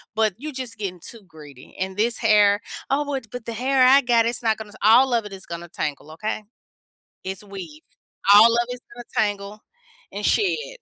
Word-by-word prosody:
but 220 -2 +2
you 300 +2 -7
just 255 -3 -6
getting 185 -4 -5
too 225 +3 -11
greedy, 150 -5 -15
and 190 +1 -4
this 230 +2 +1
hair, 210 -2 +4 0.3
"Oh, 285 +2 +1
would 265 -5 -4
but 245 -2 -7
the 230 - -5
hair 260 +2 +2
I 265 +2 +7
got, 240 -3 +3
it's 240 +1 -2
not 220 -1 +2
gonna 220 -1 -9
s" 205 - -16
all 245 +5 +6
of 230 -2 +1
it 205 - -9
is 190 -1 -10
gonna 170 0 -7
tangle, 150 -1 -5
okay? 215 +6 -4 0.8
It's 190 +1 -6
weave. 185 -7 -10 0.5
All 220 +3 +8
of 235 0 +1
it's 250 0 -6
gonna 240 0 -10 0.2
tangle 205 +1 -7 0.5
and - - -6
shed. 460 +5 0
220 Hz, 200 wpm, -23 LUFS, 195-245 Hz, 0.8 s, All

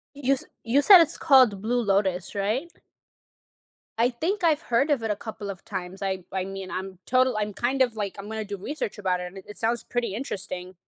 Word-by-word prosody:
You 275 -1 +2
s 270 - -3 0.2
you 265 +5 +2
said 380 +3 +10
it's 330 -1 +2
called 255 -10 +5
Blue 245 +2 +1
Lotus, 195 -3 0
right? 220 +12 -1 1.3
I 235 - +4
think 350 - -2
I've 320 -1 +3
heard 275 +6 +1
of 270 -6 +2
it 220 - -2
a 205 - 0
couple 210 -2 -7
of 190 - -9
times. 185 +2 -6
I 190 -2 -2
I 190 -1 -1
mean, 195 -1 -7
I'm 185 0 -5
total 255 -1 +3
I'm 210 0 -2
kind 255 +6 +1
of, 240 -3 0
like, 205 -2 -3
I'm 200 +1 -7
gonna 220 -1 -4
do 200 0 -5
research 215 +1 -5
about 185 -2 0
it, - - -4
and - - -8
it 210 - -10
sounds 230 +1 0
pretty 235 -5 -2
interesting. 190 -6 -5
215 Hz, 215 wpm, -26 LUFS, 195-260 Hz, 1.3 s, said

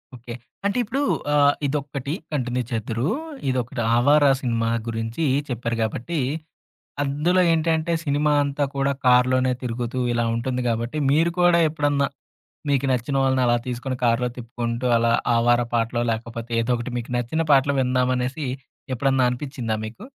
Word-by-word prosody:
Okay. 120 0 -9 0.3
అంటే 200 +4 +1
ఇప్పుడు 265 +5 -2 0.3
ఆహ్, 145 -1 +5
ఇదొక్కటి 140 0 -3 0.2
కంటిన్యూ 125 -3 -1
చేద్దురు. 115 +2 -2 0.4
ఇదొకటి 125 -2 -2 0.2
'ఆవార' 145 +4 +5
సినిమా 115 -2 0 0.2
గురించి 115 +6 -3 0.3
చెప్పారు 115 -1 -2
కాబట్టి, 125 +9 -3 0.9
అందులో 150 +6 +1
ఏంటంటే 165 +1 +1
సినిమా 150 +1 +2
అంతా 140 +1 -1
కూడా 140 0 +1 0.2
కార్లోనే 125 +1 +4
తిరుగుతూ 120 +1 -3
ఇలా 120 0 +1
ఉంటుంది 125 +1 -2
గాబట్టి, 115 +5 -2
మీరు 165 +3 +3
కూడా 175 -1 +5
ఎప్పుడన్నా 145 -2 +1 0.6
మీకు 140 -1 +2
నచ్చిన 125 +3 -1
వాళ్ళని 130 -1 +2
అలా 120 0 +3
తీసుకొని 125 +1 -3
కార్లో 120 +1 +2
తిప్పుకుంటూ 120 0 -4
అలా 115 0 +2 0.2
'ఆవారా' 120 0 +3
పాటలో, 115 +1 0
లేకపోతే 115 +1 -5
ఏదో 125 +2 0
ఒకటి 120 +1 -5
మీకు 120 - -8
నచ్చిన 140 +7 -1
పాటలు 140 0 +4
విందాం 125 0 +1
అనేసి 130 +3 -3 0.5
ఎప్పుడన్నా 135 0 +2
అనిపిచ్చిందా 125 -4 -3
మీకు? 110 - -9
125 Hz, 140 wpm, -23 LUFS, 120-145 Hz, 0.9 s, ఆహ్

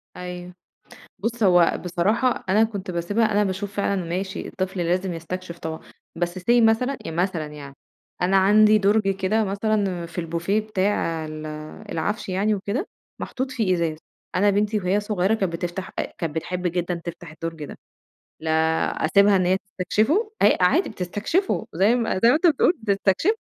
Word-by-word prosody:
أيوه، 180 0 -7 0.7
بُصّ 230 +3 -3
هو 175 -3 +5
بصراحة، 210 +8 +1
أنا 215 +4 +4
كنت 200 -4 -5
باسيبها، 205 +6 0
أنا 210 0 +3
باشوف 195 +1 -3
فعلًا 200 -2 0
ماشي 185 +3 -4
الطفل 185 -1 -3
لازم 180 +2 0
يستكشف 170 +1 -6
طبعًا، 160 -1 -5 0.4
بس 175 +2 -2
say 180 - -12 0.2
مثلًا، 225 +4 +3
إ - - -4
مثلًا 170 -2 -1
يعني، 145 -2 -10 0.5
أنا 185 +2 +3
عندي 215 +2 +6
دُرج 205 0 +2
كده 195 +3 +1
مثلًا 200 -3 -1
في 165 +1 -11
البوفيه 170 +5 -1
بتاع 190 -6 -1
ال 155 0 -7 0.5
العَفش 165 +7 -2
يعني 200 +3 +1
وكده، 205 - -3 0.3
محطوط 260 0 -3
فيه 220 -8 +1
إزاز، 165 -2 -1 0.4
أنا 205 +3 +4
بنتي 210 +2 +1
وهي 195 +1 +1
صغيّرة 205 0 +1
كانت 190 -6 -1
بتفتح 175 +2 -4
أ - - +2 0.2
كانت 165 -3 -3
بتحب 180 +3 -3
جدًا 175 +1 -1
تفتح 170 -2 -7
الدُرج 165 -1 -6
ده، - - -10 0.6
لا 160 0 -3 0.5
أسيبها 200 +4 +5
إن 185 -1 +2
هي 185 +1 +3
تستكشفه! 215 - 0
هي 205 - +6
عادي 275 - +3
بتستكشفه، 215 - -1
زي 195 +7 +3
ما 235 -2 0
زي 230 - +7
ما 245 - +6
أنت 320 +4 +3
بتقول 330 +1 +4
بتستكشف 200 - +2
190 Hz, 165 wpm, -23 LUFS, 175-215 Hz, 0.7 s, زي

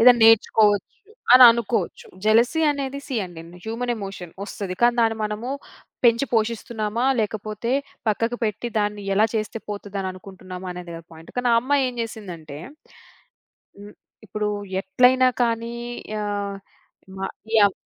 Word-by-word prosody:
ఏదైనా 245 +1 +8
నేర్చుకోవచ్చు, 215 -2 +4 0.4
అని 255 +1 +10
అనుకోచ్చు. 230 -5 -2 0.2
జలసీ 235 +8 +4
అనేది 280 -1 -3
సీ 275 - -5
అండి, 175 -3 -10 0.2
హ్యూమన్ 235 +2 -2
ఎమోషన్. 195 -4 -7
వస్తది. 200 -2 -5
కానీ 240 0 +5
దాన్ని 225 -1 +2
మనము 215 +3 -4 0.6
పెంచి 235 +3 +4
పోషిస్తున్నామా, 225 0 -1 0.2
లేకపోతే 215 +2 -3 0.4
పక్కకు 230 +3 0
పెట్టి, 220 +2 -2
దాన్ని 205 0 -1
ఎలా 210 +3 +4
చేస్తే 215 +1 -2
పోతదని 200 -2 -4
అనుకుంటున్నామా, 185 -1 -9
అనేది 180 -1 -8
గదా 165 - -11
పాయింట్. 160 0 -13
కానీ 245 -1 +2
ఆ 230 - +6
అమ్మాయేం 260 0 +1
జేసిందంటే 175 -10 -8 1.2
హ్మ్. 205 +1 -12 0.3
ఇప్పుడు 210 +1 -3 0.3
ఎట్లైనా 250 +6 +4 0.2
కానీ 230 0 -2 0.5
ఆహ్, 200 -1 -3 0.6
మ - - -8 0.4
యవ్ 200 -2 +5
215 Hz, 130 wpm, -23 LUFS, 200-235 Hz, 1.2 s, అని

